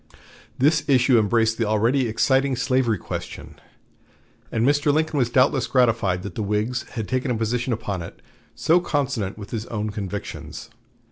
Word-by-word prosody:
This 150 +4 +3
issue 125 -2 +5
embraced 110 +1 +1
the 115 - +2
already 115 +5 +2
exciting 130 +4 +2
slavery 125 -3 +1
question, - - -8 0.9
and 115 0 +1
Mr. 145 +1 +3
Lincoln 155 0 0
was 120 -2 +2
doubtless 130 +1 +2
gratified 115 -8 +2
that 100 - -6
the 115 - -4
Whigs 105 +4 -2
had 110 -4 -4
taken 130 +1 -1
a 125 - +1
position 115 +3 -1
upon 105 -5 -3
it 85 - -9 0.4
so 170 +3 +3
consonant 135 - -2
with 105 -1 -9
his 110 -1 -4
own 105 -1 -3
convictions. 100 -1 -6
120 Hz, 155 wpm, -23 LUFS, 110-130 Hz, 0.9 s, issue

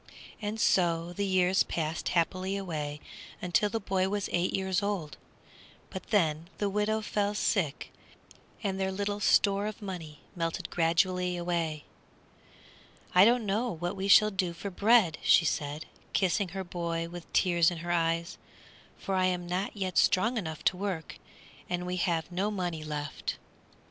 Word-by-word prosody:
And 210 +1 -3
so 170 -3 +2
the 200 +2 -1
years 185 0 +3
passed 160 0 -1
happily 185 +3 0
away 150 -6 -4 0.5
till 210 +5 +4
the 225 - -2
boy 190 -2 0
was 205 -1 -2
eight 175 +1 +1
years 190 0 0
old, 195 -7 -2 0.8
but 190 - -7
then 165 -5 +1
the 205 -1 -1
widow 210 +2 0
fell 210 -1 -1
sick, 175 -8 0 0.7
and 195 -2 -1
their 190 0 0
little 205 +1 -2
store 200 0 +3
of 215 0 -6
money 170 -8 -7
melted 165 -1 -3
gradually 180 +2 +1
away. 170 -3 -2 1.3
"I 180 +2 +8
don't 235 0 +3
know 215 +5 0
what 175 0 -3
we 195 0 -3
shall 210 +2 +7
do 185 -3 -1
for 195 +4 -6
bread," 205 -4 +4
she 170 - +5
said, 150 0 -2 0.3
kissing 190 +1 +2
her 190 +2 -5
boy 170 -2 -3
with 175 0 -10
tears 170 -3 +4
in 175 - -5
her 175 - -1
eyes, 165 0 0 0.6
"for 195 - -4
I 185 -1 +3
am 180 -1 0
not 185 +4 -3
yet 185 -5 0
strong 225 +7 +3
enough 160 -8 -4
to 185 - +2
work, 185 -5 -4 0.5
and 180 0 -2
we 180 0 -2
have 170 -2 0
no 190 +4 0
money 175 -6 -3
left." 150 -1 -4
185 Hz, 160 wpm, -29 LUFS, 170-200 Hz, 1.3 s, I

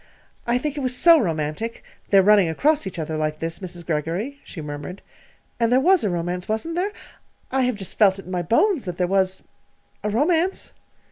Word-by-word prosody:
"I 240 +1 +2
think 295 +3 -3
it - - -2
was 255 -1 +1
so 335 +2 +7
romantic 165 - -3 0.3
their 195 -1 +6
running 200 -3 +5
across 290 - +1
each 185 - -6
other 160 -1 -3
like 155 0 -1
this, 165 +1 -4
Mrs. 175 -2 -6
Greggory," 175 - -3
she 175 - -10
murmured. 150 +5 -7 0.6
"And 230 0 +2
there 255 - +5
was 365 +5 +4
a 210 - +1
romance, 175 +1 -3
wasn't 220 +10 -2
there? 370 +4 -1 0.6
I 265 0 +1
have 250 -2 0
just 195 -3 -7
felt 195 -3 +5
in 185 -2 -10
my 180 -1 -1
bones 270 - +2
that 180 -2 -5
there 180 - +1
was 190 0 0 0.6
a 210 - 0
romance!" 325 - +1
195 Hz, 195 wpm, -23 LUFS, 175-260 Hz, 0.6 s, so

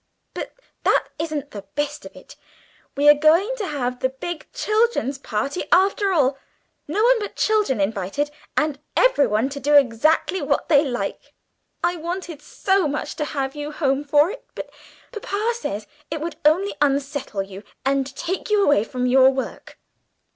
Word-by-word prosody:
"But - - -6 0.3
that - - +2
isn't 305 -3 -3
the 205 - -7
best 295 0 -3
of - - -17
it; - - -14 0.6
we 290 +1 +3
are 295 - +11
going 325 +11 +3
to 415 -5 -3
have 250 -5 -3
the 260 - +1
big 305 +5 -6
children's 430 - 0
party 275 +7 -2
after 390 +2 +3
all! 275 -6 +2 0.5
No 425 - 0
one - - +5
but 410 - -5
children 425 - +1
invited, 200 +8 -1 0.3
and 300 -2 +1 0.2
everyone 265 - +3
to 280 0 -6
do 290 +2 +2
exactly 285 +8 +3
what - - -1
they 290 -3 +6
like. 250 -5 -4 0.5
I 350 +1 +1
wanted 340 -2 -5
so 385 +3 +1
much 290 +1 -3
to 300 - -1
have 270 -2 -3
you 295 0 -5
home 280 -2 0
for 295 +4 +3
it, - - -9
but - - -7 0.4
papa 425 0 -2
says 215 - -4 0.2
it 315 - -3
would 330 +2 -5
only 360 +7 +3
unsettle 280 -6 0
you 195 0 -10 0.2
and 270 0 +1
take 370 +8 -3
you 420 -1 +3
away 290 - +4
from 250 +2 -3
your 260 +1 +6
work. 265 -1 -5
295 Hz, 165 wpm, -22 LUFS, 265-360 Hz, 0.6 s, are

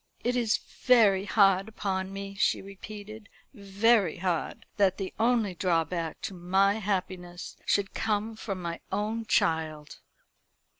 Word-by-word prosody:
"It 245 +1 0
is 235 -3 +2
very 210 -6 +3
hard 195 -1 +3
upon 190 -3 -3
me," 195 0 -6
she 195 - +1
repeated 210 +2 -10 0.2
"very 200 - +2
hard 175 -3 -2
that 195 -2 +3
the 195 -2 -5
only 225 -4 +2
drawback 170 -2 -1
to - - -4
my 190 +4 +2
happiness 185 -3 -4
should 200 -1 +1
come 215 +1 -1
from 195 -4 -5
my 170 0 -4
own 215 +3 -2
child." 155 -2 0
195 Hz, 130 wpm, -28 LUFS, 180-215 Hz, 0.2 s, very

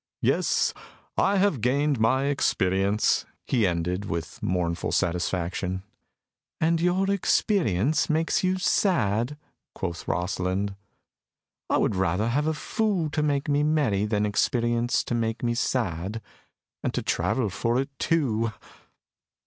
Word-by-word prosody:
"Yes, - - +2 0.4
I 200 +1 +2
have 190 - +2
gained 140 +3 +1
my 130 +5 +3
experience," 100 -7 +1 0.2
he 115 -6 +2
ended, 90 +3 -1
with 85 -3 -5
mournful 85 -2 -1
satisfaction. 90 +2 -1 0.8
"And 165 +1 +2
your 185 +3 +2
experience 155 - +1
makes 160 +3 +1
you 185 0 +2
sad?" 145 - +1 0.4
quoth 85 0 -5
Rosalind. 95 +2 -1 0.9
"I - - +3
would - - +1
rather 95 +4 +1
have 145 +6 +1
a 160 - 0
fool 195 -4 -1
to 150 - 0
make 145 -2 0
me 145 0 +2
merry 145 -10 +2
than 105 -1 +1
experience 120 +3 +1
to - - -4
make 115 0 -1
me 120 -1 +1
sad. 105 -4 -1 0.6
And - - -2
to - - -1
travel 115 -7 0
for 115 +6 0
it 135 +1 -2
too!" 115 -9 +1
115 Hz, 125 wpm, -26 LUFS, 95-150 Hz, 0.9 s, my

